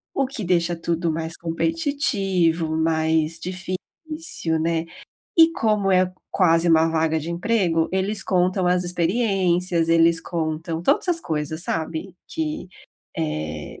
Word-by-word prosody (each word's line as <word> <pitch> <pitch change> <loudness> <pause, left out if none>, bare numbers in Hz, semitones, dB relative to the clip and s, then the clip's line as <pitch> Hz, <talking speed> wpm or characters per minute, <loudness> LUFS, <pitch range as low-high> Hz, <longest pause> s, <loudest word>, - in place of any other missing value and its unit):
O 270 -1 +1
que 255 -6 -5
deixa 175 -1 +1
tudo 170 0 -1
mais 160 +1 -2
competitivo, 185 - 0
mais 160 0 +1
difícil, 185 - -4
né. 165 0 0 0.5
E 325 0 +7
como 210 -8 +1
é 185 0 +3 0.2
quase 170 -2 +3
1 165 0 +5
vaga 160 0 +1
de 160 +2 -6
emprego, 170 -3 +1
eles 195 +2 0
contam 185 0 +1
as 180 0 +2
experiências, 180 -2 +1
eles 165 0 +4
contam 165 0 -3
todas 175 - +2
as 335 - +2
coisas, 155 - -3
sabe, 165 +3 -3
que, 310 - -4 0.5
eh 75 0 -4
170 Hz, 125 wpm, -23 LUFS, 160-195 Hz, 0.5 s, E